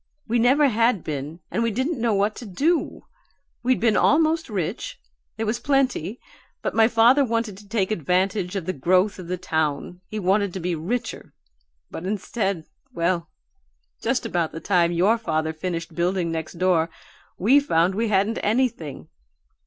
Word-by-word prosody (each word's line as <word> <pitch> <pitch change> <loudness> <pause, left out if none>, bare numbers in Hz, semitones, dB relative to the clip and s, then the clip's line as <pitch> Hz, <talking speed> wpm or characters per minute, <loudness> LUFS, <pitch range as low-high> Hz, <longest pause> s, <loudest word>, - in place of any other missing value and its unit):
We 235 +1 +1
never 270 +5 +5
had 230 -4 +2
been, 150 +3 -5
and 230 - 0
we 230 - +2
didn't 260 +5 -2
know 230 -3 +2
what 205 +2 +1
to 240 - -7
do. 300 - 0 0.6
We'd 255 +1 +2
been 225 -2 +3
almost 320 +1 +3
rich; 190 -7 -3 0.4
there 225 - -1
was 220 +2 -1
plenty, 255 - 0 0.4
but - - -1
my 225 -1 +5
father 240 +4 +5
wanted 230 -4 -1
to 205 - -16
take 210 -3 0
advantage 185 +1 0
of 190 -4 -3
the 185 - -1
growth 185 +7 +2
of 180 - -8
the 180 +1 -2
town; 160 0 -2
he 215 - -6
wanted 195 0 +1
to - - -2
be 175 0 -1
richer, 225 +9 -4 0.6
but 165 - -6
instead 200 -3 -2 0.3
well, 170 -1 -1 0.7
just 245 +1 0
about 175 -7 -1
the 165 - -5
time 175 -2 +2
your 195 +7 +3
father 160 -5 -1
finished 165 0 -4
building 175 0 0
next 160 -1 -4
door 170 -2 +2 0.5
we 245 +10 +5
found 175 - +2
we 225 +4 0
hadn't 205 +2 +1
anything. 215 - -1
195 Hz, 165 wpm, -24 LUFS, 170-230 Hz, 0.7 s, never